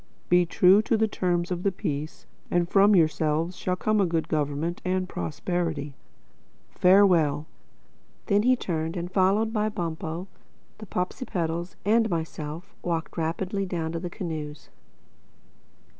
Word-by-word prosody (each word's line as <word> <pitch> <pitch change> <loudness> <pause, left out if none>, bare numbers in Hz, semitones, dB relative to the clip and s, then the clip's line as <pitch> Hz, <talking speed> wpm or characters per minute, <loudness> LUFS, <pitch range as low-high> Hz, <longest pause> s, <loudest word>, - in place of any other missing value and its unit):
Be 175 0 +4
true 185 +4 +5
to 220 +1 +1
the 220 0 +2
terms 175 -3 -1
of 175 -1 -2
the 200 - +1
Peace 150 -3 -4 0.2
and 175 -1 +1
from 200 +3 +5
yourselves 160 +1 +1
shall 180 0 -1
come 215 +3 +1
good 165 -1 -1
government 150 +3 -1
and 185 0 0
prosperity—Farewell!" 160 - 0 0.8
Then 205 -1 +3
he 255 +3 +4
turned 165 -6 -3
and 175 +1 -4
followed 200 +4 +2
by 215 -1 +1
Bumpo, 170 -2 -4 0.5
the 215 - -9
Popsipetels 175 -3 -3
and 225 +2 +3
myself, 165 +2 -4
walked 165 -2 -3
rapidly 185 +4 -2
down 165 -3 -2
to 165 - -3
the 175 +1 -5
canoes. 155 -4 -6
175 Hz, 130 wpm, -26 LUFS, 160-195 Hz, 0.8 s, true